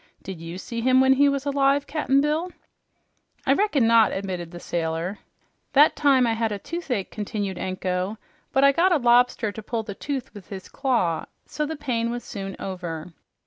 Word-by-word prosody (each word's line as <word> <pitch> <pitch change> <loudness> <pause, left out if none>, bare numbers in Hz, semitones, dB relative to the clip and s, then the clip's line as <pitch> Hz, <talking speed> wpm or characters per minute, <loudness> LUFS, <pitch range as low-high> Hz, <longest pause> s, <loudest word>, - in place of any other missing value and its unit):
Did 185 -4 -7
you 165 +2 -7
see 230 +4 -5
him 255 +2 +4
when 265 0 +6
he 285 +2 +4
was 280 0 -2
alive, 280 0 +2
Cap'n 275 -3 +1
Bill?" 310 +5 0 0.9
"I 270 - +4
reckon 300 - +2
not," 230 -1 +5
admitted 185 -3 -4
the 175 0 -9
sailor. 170 +3 -3 0.5
"That 290 +2 +6
time 270 -4 +4
I 230 - +1
had 225 -1 -1
a 205 - -2
toothache," 250 - -4
continued 205 -3 -4
Anko, 185 +2 -2 0.3
"but 270 0 +3
I 280 - +7
got 350 +6 +3
a 345 - +5
lobster 240 -3 +3
to 220 - -8
pull 225 +1 -3
the 210 -2 -6
tooth 265 +4 -5
with 205 -3 -12
his 190 -2 -8
claw, 240 - 0 0.2
so 300 -1 -3
the 320 - -4
pain 240 -6 -1
was 240 0 -4
soon 195 -3 -6
over." 175 -3 -6
230 Hz, 185 wpm, -24 LUFS, 190-275 Hz, 0.9 s, I